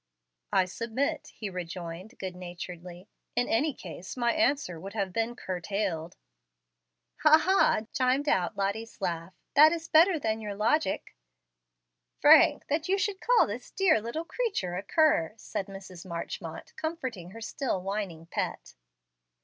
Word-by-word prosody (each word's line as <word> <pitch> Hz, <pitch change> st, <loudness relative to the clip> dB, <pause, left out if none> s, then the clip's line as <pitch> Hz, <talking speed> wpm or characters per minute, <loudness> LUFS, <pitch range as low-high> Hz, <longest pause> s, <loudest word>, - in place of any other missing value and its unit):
'" -, -, -56 dB
"I 190 Hz, -2 st, +4 dB
submit," 230 Hz, +8 st, -2 dB
he 215 Hz, -, -5 dB
rejoined, 180 Hz, +3 st, -6 dB
good 185 Hz, -2 st, -5 dB
naturedly. 180 Hz, 0 st, -8 dB, 0.3 s
"In 245 Hz, +1 st, +2 dB
any 285 Hz, +7 st, +2 dB
case 185 Hz, -, -9 dB
my 240 Hz, -1 st, +2 dB
answer 280 Hz, -, +1 dB
would 195 Hz, +4 st, -8 dB
have 195 Hz, -4 st, -2 dB
been 230 Hz, +3 st, -1 dB
CURTAILED" 180 Hz, -3 st, -3 dB, 1.0 s
"Ha, 305 Hz, +1 st, +8 dB
ha!" 375 Hz, -, +3 dB
chimed 260 Hz, +3 st, +2 dB
out 180 Hz, -, +1 dB
Lottie's 200 Hz, +4 st, -2 dB
laugh. 175 Hz, -2 st, -3 dB, 0.2 s
"That 305 Hz, +2 st, +8 dB
is 330 Hz, -1 st, -3 dB
better 335 Hz, +3 st, +6 dB
than 220 Hz, -6 st, -1 dB
your 205 Hz, -2 st, -4 dB
logic." 220 Hz, +2 st, 0 dB, 1.0 s
"Frank! -, -, +7 dB
that 305 Hz, +2 st, -1 dB
you 390 Hz, -, +3 dB
should 390 Hz, 0 st, -1 dB
call -, -, +5 dB
this 225 Hz, +4 st, -6 dB
dear 370 Hz, -, +3 dB
little 235 Hz, +9 st, -4 dB
creature 390 Hz, -, -2 dB
a 185 Hz, -, -2 dB
cur!" 205 Hz, -, +2 dB
said 195 Hz, -, -4 dB
Mrs. 190 Hz, -3 st, -10 dB
Marchmont, 170 Hz, -3 st, -6 dB
comforting 260 Hz, -, -4 dB
her 225 Hz, +5 st, -10 dB
still 230 Hz, -1 st, -2 dB
whining 190 Hz, -4 st, -4 dB
pet. -, -, -4 dB
210 Hz, 145 wpm, -29 LUFS, 180-285 Hz, 1.0 s, Ha